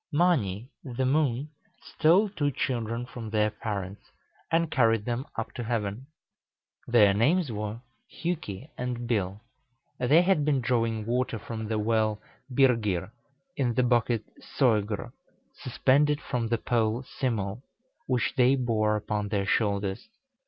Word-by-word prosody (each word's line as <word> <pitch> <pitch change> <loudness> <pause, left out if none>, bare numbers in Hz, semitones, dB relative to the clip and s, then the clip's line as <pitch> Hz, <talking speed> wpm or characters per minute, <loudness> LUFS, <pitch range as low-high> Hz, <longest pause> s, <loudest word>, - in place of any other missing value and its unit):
Mâni, 135 - +1 0.2
the 130 0 -2
moon, 140 0 +1 0.3
stole 180 +7 +3
two 150 -7 0
children 120 -3 -2
from 120 -3 -8
their 105 0 +1
parents, 100 -2 -5 0.5
and 165 -1 +2
carried 115 -4 +3
them 120 +2 -2
up 115 - -4
to 120 - -5
heaven. 115 +1 -3 0.8
Their 105 -5 +5
names 145 - +2
were 105 +1 -4 0.3
Hjuki 155 - -4
and 125 -1 -3
Bil. 100 -3 -1 0.6
They 145 +8 +5
had 180 -5 +3
been 145 -2 +2
drawing 115 -3 0
water 125 0 0
from 110 +1 -6
the 110 0 -1
well 110 -1 +1 0.3
Byrgir, 110 -8 +2 0.4
in 125 -5 0
the 125 - +3
bucket 120 -2 +2 0.2
Sœgr, 110 -6 0 0.4
suspended 145 +2 +2
from 120 -2 -2
the 115 +1 +1
pole 115 +1 0
Simul, 120 -5 -3 0.5
which 125 -7 0
they 130 +1 +5
bore 110 -4 +1
upon 105 0 -2
their 100 -2 0
shoulders. 100 -2 0
115 Hz, 130 wpm, -28 LUFS, 105-130 Hz, 0.8 s, Their